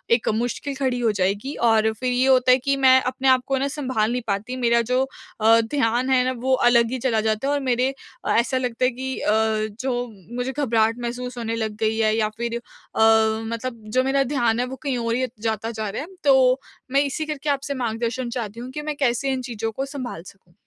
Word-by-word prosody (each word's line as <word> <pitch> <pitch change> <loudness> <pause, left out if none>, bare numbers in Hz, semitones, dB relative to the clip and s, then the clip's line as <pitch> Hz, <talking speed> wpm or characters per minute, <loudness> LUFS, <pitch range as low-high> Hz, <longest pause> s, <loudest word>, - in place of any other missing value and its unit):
एक 230 - -2
मुश्किल 245 +5 -2
खड़ी 260 -2 -1
हो 230 -2 +2
जाएगी 200 +7 -1 0.2
और 220 0 +3
फिर 250 +3 -2
ये 250 +2 +2
होता 255 -1 +5
है 255 - +6
कि 275 +2 0
मैं 260 -1 +6
अपने 260 +1 -2
आप 260 - +7
को 270 0 0
सँभाल 255 -7 -1
नहीं 245 0 -1
पाती। 210 +5 -2
मेरा 235 -1 +3
जो 255 +1 +3 0.4
अ, 225 +1 +6
ध्यान 240 +1 0
है 255 -1 +4
ना 255 - +1
वो 260 +2 +1
अलग 235 -1 +4
ही 260 - -1
चला 230 -3 +1
जाता 220 +4 0
है 285 - +1
और 290 - +1
मेरे 250 0 +1 0.4
अ, - - 0
ऐसा 250 +3 +2
लगता 250 -1 -1
है - - +4
कि 260 +1 -5
अ, 210 - +1 0.5
जो 245 -2 -1 0.3
मुझे 250 +1 -2
घबराहट 230 -5 +1
महसूस 245 +1 -5
होने 230 -1 -2
लग 220 -2 -3
गई 220 0 +1
है 220 -1 +2
या 215 -1 +1
फिर 235 0 -2
अ, - - -8 0.4
मतलब 225 +2 +2 0.2
जो 255 - +5
मेरा 275 +1 +2
ध्यान 240 -3 +2
है 250 - +1
वो 260 - -6
कहीं 270 -3 -1
और 230 -1 -1
ही 255 - +1 0.2
जाता 220 +1 -2
जा 220 -2 -4
रहा 215 - -4
है 315 - -7 0.2
तो 265 -2 +5 0.3
मैं 275 +1 +4
इसी 290 +2 -2
करके 300 -1 -4
आपसे 280 0 -1
मार्गदर्शन 235 +2 -2
चाहती 230 -2 -5
हूँ 250 +2 -7
कि 300 - -5
मैं 300 0 -4
कैसे 270 0 +1
इन 260 - -2
चीज़ों 225 -2 -4
को 270 +5 -3
सँभाल 255 - -6
सकूँ? 185 -2 -17
245 Hz, 225 wpm, -23 LUFS, 225-265 Hz, 0.5 s, आप